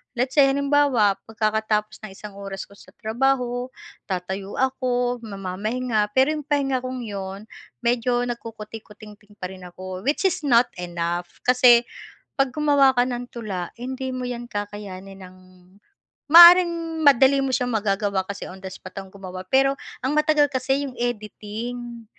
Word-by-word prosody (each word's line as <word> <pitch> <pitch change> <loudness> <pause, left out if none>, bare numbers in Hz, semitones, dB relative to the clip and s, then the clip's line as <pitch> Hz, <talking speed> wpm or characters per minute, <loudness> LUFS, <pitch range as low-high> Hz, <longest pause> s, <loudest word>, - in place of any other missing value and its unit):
let's 255 +2 -1
say 285 - +7
halimbawa 275 -7 +3
pagkakatapos 215 -1 -1
ng 205 - -7
isang 210 -1 -10
oras 195 -1 -7
ko 200 - -18
sa - - -17
trabaho, 245 +2 0 0.4
tatayo 190 +1 -4
ako, 250 -2 0
mamamahinga, 210 +3 -2
pero 265 +2 +5
'yung 300 - -5
pahinga 270 -4 0
kong 255 -1 -5
'yun, 195 -2 -6 0.4
medyo 245 0 +1
nagkukutikutingting 215 -2 -10
pa 180 - -4
rin 185 -1 -11
ako, 185 +1 -8
which 300 +7 +2
is 320 - -3
not 245 -3 +4
enough, 175 0 -3 0.2
kasi 245 -1 +6 0.5
pag 270 -2 +1
gumawa 285 -3 +4
ka 245 - +3
ng 245 -1 -3
tula 195 -7 -5
hindi 260 +2 -5
mo 250 -1 -4
'yan 240 -1 -5
kakayanin 200 -2 -7
ng 185 0 -16 0.9
maaaring 340 -1 +7
madali 275 0 +6
mo 270 - -1
siyang 250 -1 0
magagawa 200 -2 0
kasi 200 - -6
on 190 - -11
the 190 - -6
spot 185 - -11
akong 195 -1 -9
gumawa, 185 -1 -8
pero 270 +4 +3 0.3
ang 270 +3 0
matagal 300 -2 +3
kasi 270 +1 0
'yong 260 - -8
editing. 235 +1 -5
235 Hz, 150 wpm, -23 LUFS, 200-265 Hz, 0.9 s, say